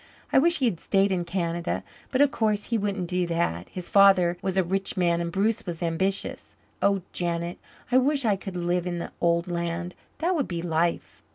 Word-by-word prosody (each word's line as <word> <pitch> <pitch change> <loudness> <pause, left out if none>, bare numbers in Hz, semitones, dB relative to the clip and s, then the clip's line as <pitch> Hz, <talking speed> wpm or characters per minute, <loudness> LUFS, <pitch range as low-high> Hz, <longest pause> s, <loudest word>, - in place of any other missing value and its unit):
I - - +7
wish 340 +4 +4
he 265 - +1
had 195 -9 0
stayed 195 0 +2
in 175 -2 0
Canada. 170 - -2 0.3
But 260 - +1
of 285 -1 +5
course 215 0 0
he 230 - +3
wouldn't 200 -3 -2
do 180 0 0
that. 165 - -1
His 180 -2 -6
father 195 -3 +5
was 190 0 -2
a 190 - +4
rich 195 +3 -2
man 170 -1 +2
and 170 0 -3
Bruce 210 +5 +1
was 175 0 -4
ambitious. 190 +4 -2 0.3
Oh, 200 -2 +2
Janet, 170 0 -2 0.3
I 255 - +6
wish 275 0 +1
I 210 -3 +3
could 190 -1 -7
live 175 0 0
in 175 -1 -2
the 170 - -5
old 170 0 +2
land. 170 0 -3 0.2
That 350 +3 +1
would 300 -7 0
be 170 -2 -4
life." 170 0 -1
180 Hz, 205 wpm, -26 LUFS, 170-200 Hz, 0.3 s, I